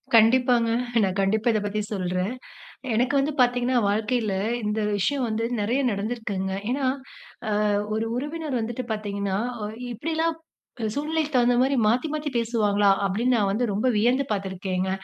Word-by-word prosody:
கண்டிப்பாங்க. 235 +1 +5 0.3
நான் 190 0 0
கண்டிப்பா 215 +4 +1
இத 215 - +2
பத்தி 210 +1 -1
சொல்றேன். 185 +3 -1 0.6
எனக்கு 245 +4 +1
வந்து 280 +3 +1
பாத்தீங்கன்னா, 245 +1 +2
வாழ்க்கையில 215 0 0 0.3
இந்த 210 +1 -1 0.2
விஷயம் 255 +7 0
வந்து 220 +1 -1 0.2
நெறைய 230 +6 +1
நடந்திருக்குங்க. 200 -2 -3 0.2
ஏன்னா, 270 +1 0 0.6
அ - - 0 0.4
ஒரு 220 +1 -1
உறவினர் 295 -1 -3
வந்துட்டு 235 +3 -3
பாத்தீங்கன்னா, 200 -2 -2 0.3
"ஒ - - -1 0.3
இப்பிடிலாம் 320 +6 -1 0.4
க் 220 -2 -1
சூழ்நிலைக்கு 310 +1 -1
தகுந்தமாரி 250 +2 +3
மாத்தி 245 +8 +2
மாத்தி 300 -1 -3
பேசுவாங்களா?" 210 -4 +2 0.2
அப்பிடீன்னு 235 +6 +1
நான் 200 -3 +2
வந்து 240 +4 +1
ரொம்ப 215 +6 0
வியந்து 245 +6 +2
பாத்துருக்கேங்க. 190 -2 -2
225 Hz, 140 wpm, -25 LUFS, 205-255 Hz, 0.6 s, கண்டிப்பாங்க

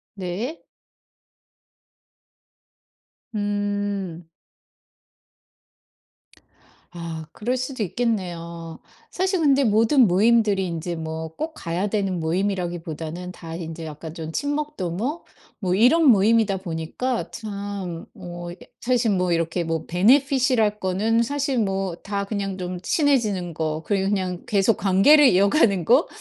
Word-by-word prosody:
네. 195 - -4 2.7
음. 205 -4 -2 2.6
아 165 -2 -6
그럴 245 +4 -1
수도 255 -2 -3
있겠네요. 170 -6 -3 0.3
사실 375 -1 0
근데 280 -2 +4
모든 225 +4 +4
모임들이 205 0 +3
인제 170 +1 -4
뭐 160 0 -5
꼭 315 +1 -3
가야 175 +5 -2
되는 195 -3 -1
모임이라기보다는 175 -1 -3
다 165 -2 -8
인제 165 -1 -6
약간 155 +1 -8
좀 160 -1 -6
친목 290 - -2
도모 205 - -3 0.3
뭐 185 -3 0
이런 260 - +5
모임이다 220 -3 +4
보니까 185 +8 -3
참 200 -5 -5
뭐 175 0 -8
이 - - -9 0.2
사실 240 -2 +1
뭐 180 -2 +1
이렇게 165 +1 0
뭐 165 -1 -2
베네핏이랄 245 - +3
거는 215 +5 +1
사실 280 -1 -1
뭐 195 -4 -1
다 200 0 -2
그냥 200 -2 -3
좀 180 -1 -4
친해지는 215 - +1
거 155 0 -2
그리고 195 -1 0
그냥 185 -3 -2
계속 200 +1 +2
관계를 205 +10 +6
이어가는 200 - +4
거? 255 - +4
195 Hz, 230 characters per minute, -23 LUFS, 175-230 Hz, 2.7 s, 관계를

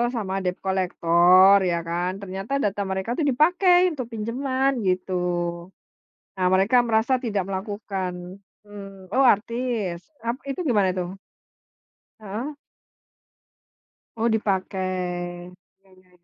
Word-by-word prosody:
sama 200 -5 -3
debt 180 0 -2
collector 185 0 +5 0.2
ya 170 - 0
kan, 175 +2 -1
ternyata 195 +6 -5
data 205 0 -1
mereka 190 +4 -3
itu 320 - 0
dipakai 355 +6 +4
untuk 260 -6 -5
pinjaman 260 +5 -1 0.2
gitu. 185 0 -1 1.2
Nah 185 -1 +1
mereka 195 +6 +3
merasa 225 +3 +2
tidak 205 -4 -1
melakukan, 195 -1 -4 0.5
mmm. 195 -2 -11
Oh 265 - +3
artis, 225 -3 -3 0.3
ap 235 +1 0
itu 275 - -4
gimana 205 -6 +3
itu? 180 -1 -2 1.2
Heeh. 220 +8 -5 1.6
Oh 230 +1 +1
dipakai, 185 -3 -2 0.3
ya 195 - -26
ya 185 - -30
195 Hz, 110 wpm, -24 LUFS, 185-230 Hz, 1.6 s, collector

